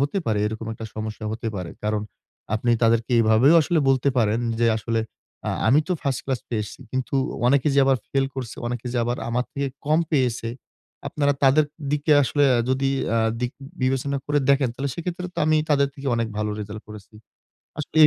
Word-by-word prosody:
হতে 145 +8 0
পারে 110 -2 +1
এরকম 110 +1 -5
একটা 110 0 -7
সমস্যা 110 0 -5
হতে 115 +1 -3
পারে। 90 -3 -5
কারণ 105 0 0 0.5
আপনি 120 +2 0
তাদেরকে 115 +1 +2
এভাবেও 115 +7 +5
আসলে 170 +2 +1
বলতে 135 0 +3
পারেন 110 0 +2 0.2
যে, 120 - +4
"আসলে 115 +1 -1 0.5
আ - - +1 0.2
আমি 145 +6 +6
তো 185 - +2
1st 135 -4 -1
class 130 -3 -2
পেয়ে 110 -3 -1
এসছি 105 - -11
কিন্তু 130 +1 -2 0.3
অনেকে 140 +3 +3
যে - - +4
আবার 135 0 +4
ফেল 135 -1 +1
করছে, 130 -4 -5
অনেকে 120 0 -4
যে 120 - 0
আবার 120 +1 -1
আমার 120 +1 0
থেকে 140 -1 -2 0.2
কম 155 +2 +4
পেয়েছে, 125 -5 +1 0.6
আপনারা 145 -1 +1
তাদের 140 +3 +5 0.3
দিকে 150 +1 +2
আসলে 145 +2 +2
আ - - +2
যদি 135 +1 +1 0.3
আ - - +3 0.2
দিক 125 0 -1 0.3
বিবেচনা 135 +2 0
করে 145 0 +2
দেখেন 140 -2 +3
তাহলে 140 +1 -3
সেক্ষেত্রে 180 +2 -4
তো - - -5
আমি 155 0 +4
তাদের 140 -1 +4
থেকে 140 -1 -8
অনেক 115 -1 0
ভালো 105 0 -1
result 105 +1 -7
করেছি।" 105 0 -12 0.6
আসলে 150 - -6
এ - - +11
130 Hz, 195 wpm, -24 LUFS, 115-140 Hz, 0.6 s, এ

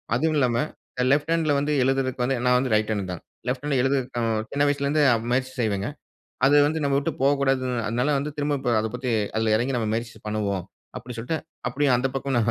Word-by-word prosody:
அதுவுமில்லாம 135 -4 +2 0.5
left 145 +3 +2
ஹேண்ட்ல 165 -2 +2
வந்து 145 +2 -1
எழுதுறதுக்கு 130 -1 0
வந்து 135 +2 +1
நா 125 - +4
வந்து 130 -1 -1
ரைட் 110 0 +1
ஹேண்ட் 100 -3 -3
தா. - - -3 0.3
லெஃப்ட் 125 +2 -2
ஹேண்ட்ல 145 -3 +1
எழுதுறதுகு 120 -5 0
சின்ன 140 - +1
வயசிலிருந்தே 145 +1 +1 0.3
முயற்சி 130 +1 0
செய்வேங்க. 100 -3 -1 0.6
அது 145 +2 +5
வந்து 160 +2 0
நம்ம 140 -1 +2
விட்டு 140 - -1
போகக்கூடாது 135 -1 +2 0.3
அதனால 120 +5 0
வந்து 145 +2 -3
திரும்ப 145 0 0 0.3
அத 110 - -1
பத்தி 125 0 -3 0.3
அதில 110 0 +2
எறங்கி 125 +4 -1
நம்ம 110 -3 -1
முயற்சி 115 -1 -4
பண்ணுவோம். 100 -4 -1 0.3
அப்படி 125 +1 -9
சொல்ட்டு 125 +8 -2 0.3
அப்படியு 140 +3 +1
அந்த 130 +2 0
பக்கம் 135 -1 -1
130 Hz, 180 wpm, -24 LUFS, 115-140 Hz, 0.6 s, அது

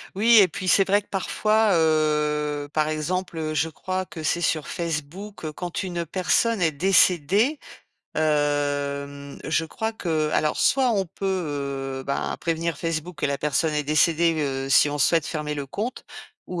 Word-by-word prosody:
Oui, 225 +3 +6
et 190 - +4
puis, 185 - -6
c'est 195 - +5
vrai 200 +1 +3
que, - - -29
parfois, 215 +2 +1
heu, 150 -2 +1
par 155 0 +1
exemple, 170 +3 -3
heu, 155 -1 -2
je 155 +1 0
crois 185 +4 -4
que 160 -3 -9
c'est 170 +2 0
sur 155 -3 0
Facebook, 170 +2 -5
quand 175 +4 -4
une 175 -2 -3
personne 190 +5 +1
est 165 -3 +2
décédée, 190 - +3 0.6
hem, 145 -2 -1
je 165 - 0
crois 220 +7 -3
qu'alors 155 -4 0
soit, 260 -2 +3
on 195 -4 0
peut, 195 +3 -9 0.8
heu, - - -8
bah, 140 - -2
prévenir 165 -2 -1
Facebook 165 +1 -4
que - - +2
la 140 0 -2
personne 150 +2 0
est 150 -1 -1
décédée, 165 +3 +3
heu, 135 -1 -2
si 145 +2 +5
on 145 - -3
souhaite 160 +2 +2
fermer 150 -2 -3
le 145 -1 -4
compte. 215 - -5 0.4
Ou 180 -1 -4
160 Hz, 165 wpm, -24 LUFS, 150-185 Hz, 0.8 s, Oui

